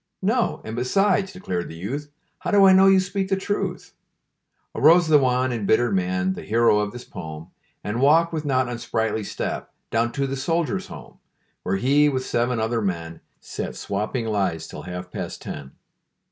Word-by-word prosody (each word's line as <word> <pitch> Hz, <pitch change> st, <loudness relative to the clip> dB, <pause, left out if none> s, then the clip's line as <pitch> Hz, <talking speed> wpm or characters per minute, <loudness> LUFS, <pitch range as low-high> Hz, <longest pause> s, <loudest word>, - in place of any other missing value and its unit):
"No. 225 Hz, +4 st, +1 dB
And, 110 Hz, -, -5 dB
besides," 195 Hz, -, +1 dB
declared 90 Hz, -, -4 dB
the 80 Hz, -, -9 dB
youth, 135 Hz, -, -5 dB, 0.3 s
"How -, -, -4 dB
do 200 Hz, -2 st, +6 dB
I 190 Hz, -, +8 dB
know 190 Hz, +1 st, +6 dB
you 195 Hz, 0 st, +6 dB
speak 190 Hz, +1 st, -2 dB
the 195 Hz, -, +2 dB
truth?" 200 Hz, +1 st, -3 dB, 0.8 s
Arose 165 Hz, +4 st, +5 dB
the 155 Hz, -2 st, +6 dB
Wan, 130 Hz, -1 st, +1 dB
embittered 110 Hz, 0 st, +2 dB
man, 90 Hz, 0 st, 0 dB
The -, -, -7 dB
hero 115 Hz, 0 st, +3 dB
of 105 Hz, 0 st, -1 dB
this 120 Hz, +2 st, -9 dB
pome, 80 Hz, +2 st, -9 dB, 0.3 s
And 110 Hz, +4 st, -2 dB
walked, 165 Hz, +4 st, +4 dB
with 155 Hz, -2 st, -2 dB
not 130 Hz, -3 st, +1 dB
unsprightly 110 Hz, -2 st, -2 dB
step, -, -, -4 dB, 0.2 s
Down 115 Hz, +1 st, +1 dB
to 140 Hz, -1 st, -1 dB
the 135 Hz, 0 st, -3 dB
Soldiers' 165 Hz, +6 st, -1 dB
Home, -, -, -12 dB, 0.4 s
Where 95 Hz, -, -1 dB
he, 145 Hz, +6 st, +4 dB
with 130 Hz, -2 st, -2 dB
seven 120 Hz, 0 st, 0 dB
other 115 Hz, +1 st, 0 dB
men, 85 Hz, -4 st, -3 dB, 0.2 s
Sat -, -, -5 dB
swapping 105 Hz, +4 st, -3 dB
lies 100 Hz, -7 st, -1 dB
till -, -, -9 dB
half 90 Hz, 0 st, -7 dB
past -, -, -6 dB
ten. 70 Hz, -3 st, -7 dB
125 Hz, 175 wpm, -23 LUFS, 100-160 Hz, 0.8 s, I